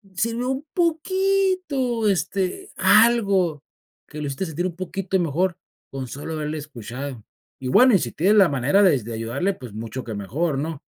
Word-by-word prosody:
si 230 Hz, +6 st, 0 dB
no 250 Hz, +2 st, -2 dB
un 265 Hz, +3 st, -4 dB
poquito, 355 Hz, -, +1 dB
este, 195 Hz, -, -2 dB
algo 200 Hz, -8 st, +4 dB, 0.4 s
que 150 Hz, -, -9 dB
lo 150 Hz, -, -3 dB
hiciste 140 Hz, +7 st, -3 dB
sentir 165 Hz, +3 st, -3 dB
un 175 Hz, -, -7 dB
poquito 185 Hz, +1 st, -2 dB
mejor 175 Hz, +2 st, 0 dB, 0.3 s
con 135 Hz, -1 st, -5 dB
solo 145 Hz, +6 st, -6 dB
haberle 155 Hz, 0 st, -3 dB
escuchado. 130 Hz, -3 st, -7 dB, 0.4 s
Y 130 Hz, -, -5 dB
bueno, 250 Hz, -, +6 dB
y -, -, +4 dB
si 120 Hz, -6 st, -3 dB
tienes 195 Hz, +7 st, +3 dB
la 195 Hz, -4 st, +6 dB
manera 140 Hz, +8 st, +2 dB
des 140 Hz, -, +3 dB
de 115 Hz, -, -6 dB
ayudarle, 120 Hz, -, -1 dB
pues 125 Hz, -, -10 dB
mucho 115 Hz, +4 st, -6 dB
que 110 Hz, -, -6 dB
mejor, 140 Hz, -, -2 dB
¿no? 155 Hz, 0 st, -4 dB
175 Hz, 175 wpm, -23 LUFS, 135-220 Hz, 0.4 s, bueno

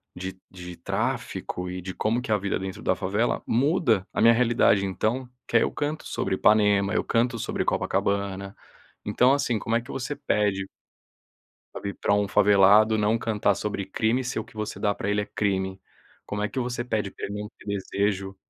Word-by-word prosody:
de 95 Hz, +1 st, -6 dB
de 90 Hz, -1 st, -9 dB
tráfico 90 Hz, +1 st, -3 dB
e 90 Hz, -, -5 dB
de 95 Hz, +1 st, -6 dB
como 115 Hz, +3 st, 0 dB
que 125 Hz, -, -8 dB
é 105 Hz, -, +5 dB
a -, -, +2 dB
vida 100 Hz, 0 st, -2 dB
dentro 95 Hz, 0 st, -6 dB
da 95 Hz, -, +2 dB
favela, 100 Hz, +6 st, 0 dB
muda 125 Hz, -, +2 dB
a -, -, 0 dB
minha 115 Hz, +1 st, +7 dB
realidade 115 Hz, -4 st, +3 dB
então, 115 Hz, +7 st, -1 dB, 0.2 s
que 115 Hz, -, +3 dB
aí -, -, +4 dB
eu -, -, -1 dB
canto 150 Hz, +1 st, -3 dB
sobre 95 Hz, -, -1 dB
Ipanema, 105 Hz, 0 st, +3 dB
eu -, -, +1 dB
canto 115 Hz, 0 st, 0 dB
sobre -, -, -2 dB
Copacabana". 100 Hz, 0 st, -1 dB, 0.5 s
Então 125 Hz, +6 st, +3 dB
assim, 140 Hz, -5 st, +1 dB
como 115 Hz, +2 st, -1 dB
é 115 Hz, -, +2 dB
que 120 Hz, -, -10 dB
você 135 Hz, +3 st, -4 dB
pede 100 Hz, -5 st, 0 dB, 1.1 s
pra -, -, -6 dB
vir 100 Hz, 0 st, -4 dB
pra 100 Hz, -, +2 dB
um 105 Hz, 0 st, +2 dB
favelado 105 Hz, +2 st, +5 dB
não 105 Hz, +2 st, +2 dB
cantar 105 Hz, -3 st, +1 dB
sobre 100 Hz, 0 st, -3 dB
crime 115 Hz, +6 st, 0 dB
se 125 Hz, -, -3 dB
o 110 Hz, -, -3 dB
que -, -, -20 dB
você 105 Hz, 0 st, -4 dB
dá 100 Hz, -1 st, +1 dB
pra 100 Hz, -, -4 dB
ele 105 Hz, -, +1 dB
é 105 Hz, -, -3 dB
crime? 95 Hz, -2 st, -2 dB, 0.5 s
Como 105 Hz, 0 st, -3 dB
é 105 Hz, -, 0 dB
que 135 Hz, -, -5 dB
você 120 Hz, 0 st, -3 dB
pede 105 Hz, -5 st, -2 dB
pra -, -, -6 dB
ele 105 Hz, +1 st, -5 dB
não 105 Hz, -, -6 dB
ter -, -, -17 dB
desejo 100 Hz, -1 st, -2 dB
105 Hz, 205 wpm, -26 LUFS, 95-115 Hz, 1.1 s, minha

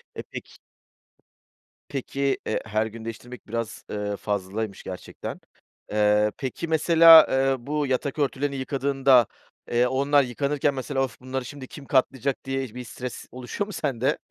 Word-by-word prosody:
E, -, -, -5 dB
Peki -, -, -10 dB, 1.3 s
Peki, 135 Hz, 0 st, -1 dB
eee, 110 Hz, -, -1 dB
her 110 Hz, 0 st, 0 dB
gün 110 Hz, 0 st, -8 dB
değiştirmek 120 Hz, +2 st, -8 dB
biraz, 115 Hz, 0 st, -4 dB
eee, 105 Hz, -1 st, -3 dB
fazlaymış 100 Hz, +1 st, -3 dB
gerçekten. 90 Hz, -, -7 dB, 0.5 s
Eee, 105 Hz, 0 st, +3 dB
peki, 135 Hz, +5 st, -4 dB
mesela, 160 Hz, 0 st, +8 dB
eee, 135 Hz, 0 st, +2 dB
bu 150 Hz, 0 st, 0 dB
yatak 135 Hz, +3 st, -1 dB
örtülerini 140 Hz, 0 st, 0 dB
yıkadığında, 135 Hz, -2 st, +3 dB, 0.4 s
eee, 120 Hz, +1 st, +3 dB
onlar 140 Hz, +2 st, +3 dB
yıkanırken 140 Hz, +3 st, 0 dB
mesela: 135 Hz, 0 st, -1 dB
Of, 125 Hz, -3 st, -5 dB
bunları 130 Hz, 0 st, -4 dB
şimdi 135 Hz, +1 st, -9 dB
kim 140 Hz, -, -11 dB
katlayacak. 130 Hz, 0 st, 0 dB
Diye 135 Hz, -3 st, -3 dB
bir 125 Hz, -, -5 dB
stres 125 Hz, +1 st, -7 dB
oluşuyor 130 Hz, +11 st, -4 dB
mu 210 Hz, -, -8 dB
sende? 135 Hz, -6 st, 0 dB
130 Hz, 145 wpm, -25 LUFS, 115-140 Hz, 1.3 s, mesela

